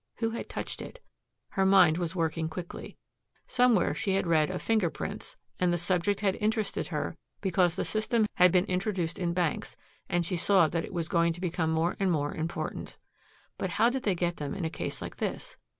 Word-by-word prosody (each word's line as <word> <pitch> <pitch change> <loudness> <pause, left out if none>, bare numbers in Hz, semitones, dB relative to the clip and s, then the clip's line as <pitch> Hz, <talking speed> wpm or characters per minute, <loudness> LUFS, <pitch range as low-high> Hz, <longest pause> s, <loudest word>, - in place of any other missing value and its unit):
Who 225 -1 -1
had 230 - -5
touched - - -4
it? - - -9 0.5
Her 195 - 0
mind 185 -4 +6
was 170 0 -2
working 160 -1 -1
quickly. 175 +2 -7 0.5
Somewhere 250 -5 +3
she 205 -4 0
had 195 - +1
read 160 -3 +3
of 185 -1 -3
finger 215 -6 +2
prints - - -6 0.2
and 180 -1 +3
the 175 - +1
subject 180 +3 +1
had 195 -2 +2
interested 215 -1 -1
her - - -3 0.2
because 180 -3 +2
the - - -1
system 220 +1 +1
had 180 -1 +6
been 180 +1 +3
introduced 180 -3 -1
in 175 -2 0
banks 175 -4 -1 0.3
and 175 -2 +1
she 180 +1 -1
saw 185 -1 +4
that 165 +1 -1
it - - -10
was 170 -3 -2
going 170 -1 +2
to 170 - -10
become 170 -2 -1
more 160 +2 +1
and 195 -2 +2
more 145 -3 0
important. 160 +2 -4 0.6
But - - -1
how 230 +3 +4
did 265 +1 -2
they 200 -5 +1
get 175 0 -1
them 145 +2 -4
in 190 -4 -3
a 160 - -2
case 150 - -4
like - - -7
this? - - -4
180 Hz, 205 wpm, -29 LUFS, 165-200 Hz, 0.6 s, mind